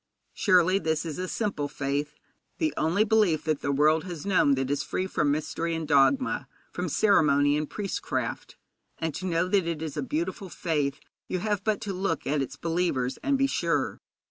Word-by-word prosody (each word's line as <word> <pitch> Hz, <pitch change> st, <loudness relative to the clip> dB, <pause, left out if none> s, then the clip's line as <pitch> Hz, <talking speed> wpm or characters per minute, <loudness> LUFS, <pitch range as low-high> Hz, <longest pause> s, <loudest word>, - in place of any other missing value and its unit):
Surely 185 Hz, -1 st, +4 dB
this 160 Hz, -2 st, -1 dB
is 160 Hz, 0 st, -5 dB
a 185 Hz, -, -2 dB
simple 200 Hz, -9 st, -2 dB
faith, 145 Hz, +1 st, -3 dB, 0.4 s
the 315 Hz, -1 st, 0 dB
only 170 Hz, +7 st, +2 dB
belief 205 Hz, -8 st, +2 dB
that 155 Hz, -3 st, -1 dB
the 140 Hz, -, 0 dB
world 155 Hz, +3 st, +3 dB
has 170 Hz, -5 st, -6 dB
known 185 Hz, -8 st, +4 dB
that 135 Hz, 0 st, -2 dB
is 145 Hz, 0 st, 0 dB
free 185 Hz, +4 st, -2 dB
from 150 Hz, -5 st, 0 dB
mystery 165 Hz, +3 st, -1 dB
and 160 Hz, -1 st, -4 dB
dogma, 160 Hz, -, +3 dB, 0.2 s
from -, -, -3 dB
ceremony 145 Hz, -8 st, +4 dB
and 150 Hz, 0 st, -2 dB
priestcraft; 200 Hz, -2 st, -4 dB, 0.4 s
and 160 Hz, -2 st, -2 dB
to 185 Hz, -, -4 dB
know 170 Hz, 0 st, +1 dB
that 185 Hz, -2 st, +2 dB
it 165 Hz, -2 st, -2 dB
is 155 Hz, -3 st, -5 dB
a -, -, -1 dB
beautiful 290 Hz, -, -3 dB
faith 145 Hz, -5 st, -1 dB, 0.3 s
you 185 Hz, -, -1 dB
have 205 Hz, +1 st, -1 dB
but 215 Hz, -2 st, +1 dB
to 200 Hz, -2 st, -3 dB
look 180 Hz, -4 st, -2 dB
at 145 Hz, 0 st, +1 dB
its 135 Hz, +1 st, -4 dB
believers 165 Hz, -6 st, -1 dB
and 280 Hz, -1 st, +1 dB
be 270 Hz, -, +3 dB
sure. 165 Hz, -, 0 dB
165 Hz, 190 wpm, -27 LUFS, 145-195 Hz, 0.4 s, Surely